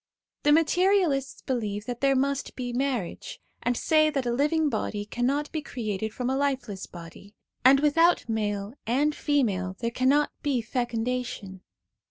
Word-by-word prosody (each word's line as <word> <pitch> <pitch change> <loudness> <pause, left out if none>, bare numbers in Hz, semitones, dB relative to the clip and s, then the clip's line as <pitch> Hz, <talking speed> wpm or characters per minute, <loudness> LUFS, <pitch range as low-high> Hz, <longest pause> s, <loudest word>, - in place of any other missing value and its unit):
The 295 - +3
materialists 325 -3 +2
believe 210 -5 -2
that 245 0 -5
there 275 -1 +3
must 275 +1 -1
be 245 -1 -4
marriage, 250 -7 -3 0.2
and 245 -1 0
say 310 -1 +3
that 275 -4 -2
a 240 - 0
living 300 +4 +2
body 205 -7 -2
cannot 270 +7 -1
be 315 - -2
created 220 -6 -4
from 245 +2 -4
a 265 - +1
lifeless 265 -8 -2
body, 175 +4 -12 0.3
and 270 +2 +7
without 330 +3 +3
male 205 -2 -2
and 285 +6 +2
female 205 -13 0
there 235 0 -1
cannot 270 +5 +2
be 280 -4 +1
fecundation. 235 -4 -3
255 Hz, 150 wpm, -27 LUFS, 220-285 Hz, 0.3 s, and